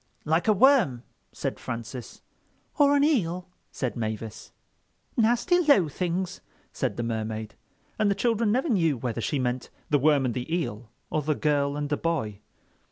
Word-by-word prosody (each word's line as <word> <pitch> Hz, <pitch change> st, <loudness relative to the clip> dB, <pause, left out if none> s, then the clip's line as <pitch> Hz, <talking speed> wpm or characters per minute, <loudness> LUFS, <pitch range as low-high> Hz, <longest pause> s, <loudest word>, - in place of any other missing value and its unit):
"Like 160 Hz, +6 st, +1 dB
a 215 Hz, -, +6 dB
worm," 210 Hz, -, +4 dB, 0.3 s
said -, -, -4 dB
Francis. 115 Hz, +1 st, -7 dB, 0.6 s
"Or 285 Hz, 0 st, +6 dB
an 285 Hz, -, +4 dB
eel," 185 Hz, -, +1 dB, 0.2 s
said 130 Hz, -3 st, -3 dB
Mavis. 110 Hz, -1 st, -5 dB, 0.6 s
"Nasty 240 Hz, +10 st, +3 dB
low 285 Hz, -, +4 dB
things," 180 Hz, +3 st, -2 dB, 0.3 s
said -, -, -2 dB
the 120 Hz, -, -1 dB
Mermaid; 110 Hz, -1 st, -3 dB, 0.5 s
and 210 Hz, -, +3 dB
the 200 Hz, -, +2 dB
children 230 Hz, 0 st, +1 dB
never 260 Hz, +8 st, +1 dB
knew 165 Hz, -, +2 dB
whether 115 Hz, -1 st, -3 dB
she 145 Hz, -, -1 dB
meant 125 Hz, -1 st, -2 dB, 0.2 s
the 145 Hz, -, +4 dB
worm 145 Hz, -1 st, +4 dB
and 120 Hz, -, 0 dB
the 125 Hz, +5 st, -5 dB
eel, 125 Hz, -10 st, -2 dB, 0.2 s
or 155 Hz, -, +1 dB
the 150 Hz, +1 st, 0 dB
girl 145 Hz, -1 st, +1 dB
and 145 Hz, -1 st, -2 dB
the 145 Hz, -, 0 dB
boy. 110 Hz, -12 st, -2 dB
150 Hz, 165 wpm, -27 LUFS, -, 0.6 s, a